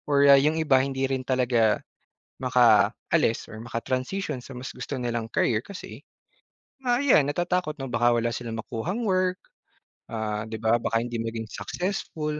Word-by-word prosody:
or 140 0 +5
ah, 140 - +10
yung 155 +4 +2
iba 145 -4 +4
hindi 135 -1 -1
rin 130 -1 -2
talaga 125 -4 +2 0.6
makaalis 120 +2 +3
or 110 +1 -9
maka-transition 130 +5 -3
sa 130 -1 -10
mas 130 - -7
gusto 130 +1 -5
nilang 120 -2 -3
career, 110 -1 +1
kasi, 200 +3 -10 0.9
ah, 245 - +4
ayan 155 - +5
natatakot 175 0 -1
na 135 - -6
baka 120 -1 +2
wala 115 0 0
silang 115 -2 -5
makuhang 160 - -3
work, 185 -2 +1 0.7
ah, 110 -1 -3
di 110 - -5
ba, 110 +2 +2
baka 115 0 0
hindi 120 -1 -4
maging 115 0 -3
successful. 150 - -3
125 Hz, 155 wpm, -26 LUFS, 115-150 Hz, 0.9 s, ah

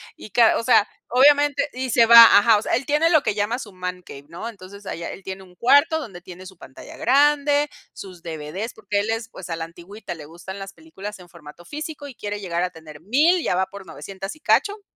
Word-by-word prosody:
y - - -12
ca 230 +1 +4
o - - -3
sea, 230 -3 +4 0.2
obviamente, 285 +2 +4
y 255 +1 -4
se 235 -1 +4
va 235 0 +10 0.2
ajá, 215 +1 +4
o - - -2
sea, - - -3
él 250 +3 -2
tiene 300 +3 +2
lo 310 -4 +4
que - - 0
llama 215 +5 -1
su 205 -6 -10
man 180 0 -6
cave, 140 -4 -12
¿no? 170 +7 -7
Entonces 200 -2 -12
allá 170 -2 -6
él 195 - -11
tiene 190 0 -7
un 180 -1 -19
cuarto, 285 - +3
donde 195 - -9
tiene 185 +1 -12
su 185 -2 -13
pantalla 135 - -13
grande, 290 +2 +2 0.2
sus 185 -3 -11
DVD, 165 +7 -6
porque 205 -2 -3
él 210 +2 -2
es, 225 0 -3
pues, 185 -6 -11
a 165 - -2
la 165 0 -5
antigüita 175 +4 -10
le 155 -3 -11
gustan 175 +5 -10
las 195 0 -9
películas 210 -10 -10
en 180 -1 -15
formato 170 0 -14
físico, 295 - -7
y 265 - -11
quiere 205 -1 -5
llegar 175 -3 -2
a 180 - -1
tener 160 -3 -14
1000 305 - +2
ya - - 0
va 190 +1 +1
por 200 0 -12
900 195 - -8
y - - -20
cacho 410 +6 +1
205 Hz, 235 wpm, -22 LUFS, 180-260 Hz, 0.2 s, va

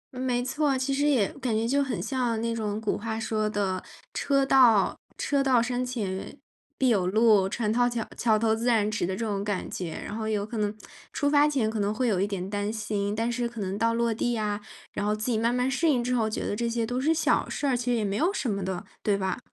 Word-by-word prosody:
没 250 -1 0
错， 285 0 +1
其 265 +1 -1
实 285 +2 +1
也 245 -9 +3
感 235 -4 0
觉 225 +1 0
就 280 +3 +2
很 265 -3 -3
像 245 -4 -1
那 230 0 -1
种 215 -2 -2
古 220 - -1
话 220 0 -3
说 215 -1 -1
的， 195 -3 -1 0.3
车 275 -1 +2
到 240 -7 +5 0.2
车 280 -1 +1
到 255 -3 +4
山 245 +1 0
前 210 -7 -4 0.4
必 260 - +3
有 195 -6 +2
路， 210 -2 +4
船 215 0 -1
到 245 0 +3
桥 235 -2 -3
桥 220 -2 +2
头 220 0 +2
自 235 +2 -3
然 215 -3 +3
直 210 -4 -1
的 190 - -2
这 230 - -3
种 200 -2 -2
感 205 -3 -2
觉。 170 -3 -4
然 210 - -5
后 220 -1 -3
有 205 -1 0
可 225 +1 -6
能 205 -1 +1 0.4
出 285 - 0
发 290 0 +5
前 270 -7 +1
可 220 -1 -2
能 205 +1 +1
会 245 +3 0
有 190 -4 +1
一 200 - +1
点 190 -2 -4
担 205 +1 -2
心， 205 -1 -2
但 230 +2 0
是 240 0 -1
可 235 -2 -9
能 190 -1 -2
到 230 +2 +1
落 235 -1 +1
地 235 +1 -1
啊， 210 -1 -2 0.3
然 205 - -3
后 210 +1 +1
自 215 +3 -2
己 220 - +1
慢 230 +2 +1
慢 250 +1 +1
适 290 +5 +1
应 250 -5 +2
之 250 +1 -1
后 220 -3 +1
觉 - - -3
得 205 - -1
这 235 +2 -1
些 230 -1 -1
都 245 +2 -2
是 310 - +2
小 325 0 +2
事 290 - -3
儿， 265 - +2
其 240 0 -3
实 245 -1 +2
也 215 - 0
没 195 0 -1
有 340 +6 +2
什 335 - -2
么 200 -3 -1
的， 185 -1 -4 0.2
对 205 -2 +1
吧？ 190 +1 -2
225 Hz, 280 characters per minute, -27 LUFS, 205-250 Hz, 0.4 s, 到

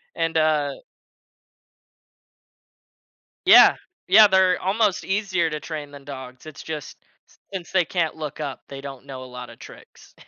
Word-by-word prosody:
And, 165 -1 -1
uh 150 -3 +1 2.7
Yeah. - - +8 0.3
Yeah, 210 +3 +8
they're 190 -1 +3
almost 200 +1 0
easier 190 -4 0
to 150 -1 -4
train 150 -3 -7
than 140 -1 -12
dogs. 130 -1 -10
It's 155 -2 -10
just 155 -2 -7 0.6
since 180 -3 -6
they 185 -3 +2
can't 165 -2 -1
look 155 -2 -7
up, 140 -3 -5
they 135 0 -9
don't 135 -1 -9
know 130 -2 -8
a - - -10
lotta 125 -1 -10
tricks. - - -16
155 Hz, 140 wpm, -23 LUFS, 140-185 Hz, 2.7 s, Yeah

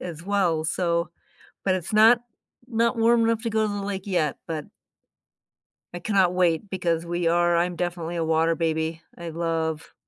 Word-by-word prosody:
as 165 -2 -7
well, 180 -5 +1
so 170 0 0 0.6
but 185 - +3
it's 185 +3 -5
not 225 +3 +6 0.5
not 230 0 +1
warm 230 0 +4
enough 225 -1 0
to 230 - -1
go 220 - +1
to 205 - -3
the 200 - -3
lake 195 -1 -4
yet, 160 -7 0
but 155 -2 -4 1.3
I 175 - -5
cannot 185 -1 +2
wait 180 +1 +1
because 170 -3 -1
we 175 0 -1
are 175 0 +3
I'm 175 +1 0
definitely 175 -1 -3
a 165 - -1
water 160 +1 +2
baby. 160 0 -1 0.2
I 170 -1 -6
love 160 -1 -3
175 Hz, 175 wpm, -25 LUFS, 165-200 Hz, 1.3 s, not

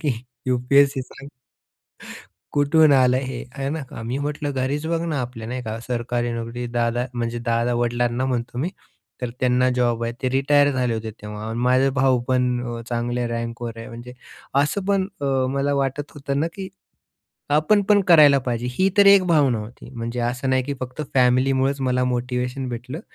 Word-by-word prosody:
की 150 -5 +1 0.3
यूपीएससी 135 +2 +3
सांग." 135 +2 -12 1.2
"कुठून 145 +1 +4
आलं 130 -1 +4
हे?" 130 -2 -4
आहे 135 0 -2
ना. 160 0 -3
अ, 115 - -8
मी 125 +4 -2
म्हटलं 145 0 -3
"घरीच 135 +3 -2
बघ 165 0 0
ना, 155 -5 -1
आपल्या 120 -3 -6
नाही 125 0 -4
का 110 0 -5
सरकारी 120 0 -2
नोकरी 115 +1 -4
दादा" 120 +1 +1
म्हणजे 120 0 -2
दादा 115 +1 +1
वडिलांना 120 +1 0
म्हणतो 120 -1 -3
मी. 155 - 0 0.5
तर 125 -2 -3
त्यांना 125 0 +3
जॉब 120 -2 +1
आहे. 115 - -2
ते 130 - +1
रिटायर 145 +2 +3
झाले 125 -3 0
होते 110 0 -4
तेव्हा. 105 +1 -6
माझे 130 +2 +4
भाऊ 130 -2 +3
पण 125 -1 +1 0.2
अ, - - -6
चांगल्या 120 0 -1
रँकवर 115 0 -4
आहे, 115 - -8
म्हणजे 120 +2 -9 0.5
असं 185 +7 -2
पण 195 -1 +2
अ, - - -3 0.3
मला 140 +1 +1
वाटत 140 +1 -2
होतं 140 -1 -2
ना, 160 - +1
की 190 -1 -6 0.9
आपण 200 +7 +3
पण 205 +1 +4
करायला 150 -4 +7
पाहिजे. 120 -1 -3
ही 190 +10 +2
तर 200 -1 +6
एक 200 -1 +7
भावना 140 -9 +3
होती, 115 +3 -10
म्हणजे 120 0 -4
असं 125 +3 -1
नाही 130 0 +2
की 140 +1 -3
फक्त 130 +4 -5
फॅमिलीमुळच 130 +2 +2
मला 125 -1 +1
मोटिव्हेशन 125 +1 -2
भेटलं. 125 +6 -6
125 Hz, 175 wpm, -22 LUFS, 120-140 Hz, 1.2 s, करायला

